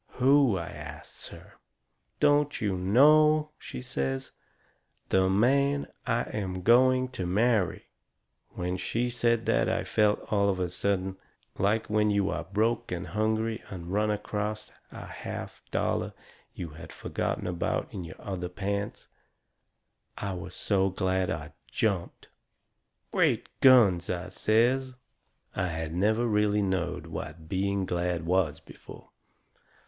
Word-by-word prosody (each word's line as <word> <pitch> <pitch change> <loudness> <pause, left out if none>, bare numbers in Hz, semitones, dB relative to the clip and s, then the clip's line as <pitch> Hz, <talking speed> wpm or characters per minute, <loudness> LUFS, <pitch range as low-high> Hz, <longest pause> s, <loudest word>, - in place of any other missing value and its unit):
"Who?" 130 -4 +4
I 85 - -4
asts 75 0 -10
her. - - -14 0.6
"Don't 145 0 +3
you 100 -3 0
know?" 150 +10 +5
she 65 - -7
says. 65 -1 -3 0.8
"The 95 0 +3
man 140 +8 +3 0.2
I 120 -1 +2
am 95 -3 -4
going 130 +3 +5
to 95 -9 -4
marry." 105 -1 +1 0.6
When 90 +1 -3
she 120 +6 -1
said 115 -1 +1
that - - +2
I - - 0
felt, 105 0 +1
all 100 -1 +3
of 95 -2 0
a 90 -1 -1
sudden, 95 +1 -1 0.4
like 105 +3 +2
when 105 0 +2
you 100 -1 +1
are - - -3
broke 110 +4 0
and 90 -2 -3
hungry 110 +2 0
and 90 -1 -7
run 105 +1 +2
acrost 105 0 -3 0.2
a - - -8
half - - -7
dollar - - -1 0.4
you 85 - -5
had 80 +1 -11
forgot - - -3
about 90 -1 -1
in 95 - -5
your 85 -1 -10
other 90 -3 -4
pants. 100 +2 -4 1.1
I 100 -1 -3
was 90 - -7
so 95 -1 +1
glad 95 0 0
I - - -4 0.2
jumped. 100 -6 -2 0.8
"Great - - +2
guns!" 105 -10 +6
I 90 0 -3
says. 125 +4 +1 0.6
I 95 -1 0
had 80 -1 -4
never 110 +6 +2
really 105 -2 +2
knowed 95 -2 -1
what 80 +1 -7
being 100 +1 0
glad 85 -2 -1
was 85 -4 +1
before. - - -14
100 Hz, 135 wpm, -28 LUFS, 90-115 Hz, 1.1 s, guns